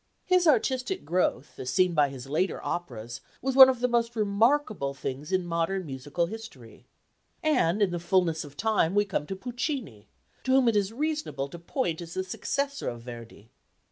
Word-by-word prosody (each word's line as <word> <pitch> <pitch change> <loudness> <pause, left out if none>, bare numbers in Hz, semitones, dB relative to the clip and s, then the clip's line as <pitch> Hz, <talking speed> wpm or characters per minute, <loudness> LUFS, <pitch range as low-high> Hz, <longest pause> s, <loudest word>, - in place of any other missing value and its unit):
His 365 -2 +3
artistic 260 - +1
growth, 170 -6 -1
as 130 - -4
seen 180 +6 +3
by 145 -3 +3
his 135 -2 -8
later 155 +7 -1
operas, 120 -10 -5 0.2
was 265 0 -2
one 265 -1 +11
of 255 -2 -1
the 250 - +3
most 235 -1 0
remarkable 215 - +1
things 140 +3 -5
in 185 -1 +1
modern 175 +2 -1
musical 145 +4 -2
history. 180 - -10 0.6
And 215 - +2
in 190 - +1
the 175 - -2
fulness 175 -2 +1
of 145 -1 -13
time 210 -5 +1
we 205 0 +4
come 185 -7 -2
to 195 - -4
Puccini, 240 - -4 0.4
to 260 - +1
whom 265 -2 +5
it 230 - +3
is 205 0 +1
reasonable 295 - -2
to 170 - -9
point 170 - -2
as 170 0 -8
the 185 - -1
successor 280 +9 -2
of 120 -1 -7
Verdi. 115 -2 -11
185 Hz, 180 wpm, -27 LUFS, 145-245 Hz, 0.6 s, one